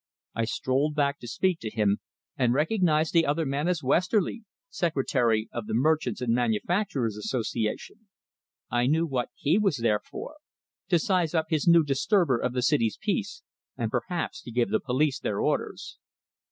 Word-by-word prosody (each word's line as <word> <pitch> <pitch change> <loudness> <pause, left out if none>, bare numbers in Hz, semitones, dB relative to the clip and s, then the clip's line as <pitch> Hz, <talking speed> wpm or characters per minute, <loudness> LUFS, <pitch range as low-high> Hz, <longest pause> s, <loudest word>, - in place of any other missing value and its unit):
I 115 0 0
strolled 135 +6 0
back 140 -1 +1
to 120 - -9
speak 180 +8 0
to 110 - -4
him, 105 -2 +1 0.4
and 125 -1 +2
recognized 160 -1 +2
the 165 -1 +5
other 155 +3 0
man 140 +3 -1
as 180 -4 0
Westerly, 185 - +1 0.2
secretary 130 - 0
of 115 -3 -5
the - - -2
Merchants' 130 -3 +1
and 120 -2 +1
Manufacturers' 120 - 0
Association. 115 - -3 0.6
I 120 +1 +2
knew 160 +4 +2
what 130 -6 -2
he 165 +8 +2
was 195 -9 +1
there 115 -3 +1
for - - -8 0.5
to 175 - +4
size 175 -1 0
up 160 -1 0
this 155 -1 0
new 170 -1 +7
disturber 145 - +2
Of 125 - -1
the 125 -1 -1
city's 115 -7 +2
peace, 200 -4 -2 0.3
and 115 -3 -2
perhaps 160 +8 -3
to 120 - -9
give 120 0 0
the - - +2
police 135 +2 0
their - - -2
orders. - - -2
140 Hz, 165 wpm, -27 LUFS, 120-170 Hz, 0.6 s, new